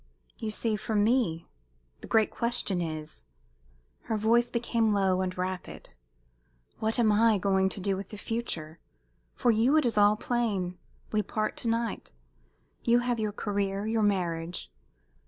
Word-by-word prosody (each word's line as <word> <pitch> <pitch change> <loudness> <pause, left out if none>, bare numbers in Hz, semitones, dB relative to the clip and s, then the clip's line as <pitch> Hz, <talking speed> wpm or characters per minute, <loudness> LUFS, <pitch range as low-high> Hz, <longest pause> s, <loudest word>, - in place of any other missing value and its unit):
"You 220 - -3
see, 215 0 -1
for 215 +1 -3
me 205 -6 +2 0.5
the - - -10
great 220 -1 +3
question 235 -6 -1
is 155 - -6 0.4
" - - -36
her 220 - -1
voice 235 +3 +3
became 230 -2 +1
low 190 -2 +2
and 185 -1 -3
rapid 185 - -5 0.9
"What 220 +2 +1
am 225 -3 +4
I 220 +1 +4
going 190 0 +2
to 195 - -5
do 195 +1 0
with 190 0 -6
the 210 - -8
future? 170 -9 -4 0.6
For 245 - +3
you 235 +7 +3
it 310 - +3
is 225 -3 +2
all 205 +1 +6
plain. 210 -7 -1 0.3
We 215 - +2
part 215 +2 -2
to - - -3
night. 230 -1 -1 0.7
You 235 0 +4
have 245 -1 -1
your 215 -1 -1
career, 200 -1 -2
your 220 0 +1
marriage. 170 - -1
210 Hz, 155 wpm, -29 LUFS, 185-230 Hz, 0.9 s, all